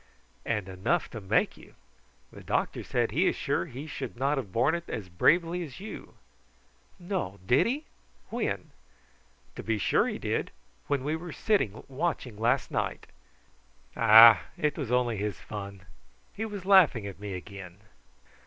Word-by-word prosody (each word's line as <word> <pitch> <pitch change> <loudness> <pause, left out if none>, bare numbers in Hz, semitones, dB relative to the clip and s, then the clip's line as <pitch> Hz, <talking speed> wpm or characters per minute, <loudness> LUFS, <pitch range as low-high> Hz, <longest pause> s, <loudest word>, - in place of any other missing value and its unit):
"And 105 -5 -1
enough 95 +3 -1
to 115 - -7
make 95 - +1
you. - - -16 0.6
The - - -12
doctor - - -1
said - - 0
he - - +2
is - - +1
sure 90 - -1
he 135 +5 -8
should 150 -5 -6
not 135 +2 +1
have 105 -8 -7
borne 120 +9 +2
it 170 0 -4
so 110 - -4
bravely 170 - +3
as 155 +1 -9
you." 210 +2 -9 0.8
"No: 175 - -4
did 125 - +4
he? 285 +6 -2 0.5
When?" - - -3 0.8
"To - - -6
be 110 -1 -1
sure - - +2
he - - -3
did, - - -2 0.4
when 140 -2 0
we 150 +3 -1
were 165 +1 -7
sitting 150 - 0
watching 135 -4 -3
last 115 +3 0
night." - - -2 0.9
"Bah! 115 -1 +9 0.2
it 150 -1 0
was 135 -7 -4
only 125 -3 +1
his 105 +1 -3
fun. 100 -2 -8 0.5
He 220 - -4
was 205 -4 -7
laughing 180 - +5
at 100 -2 -8
me 100 -2 -5
again." 90 -1 -9
120 Hz, 160 wpm, -28 LUFS, 105-165 Hz, 0.9 s, Bah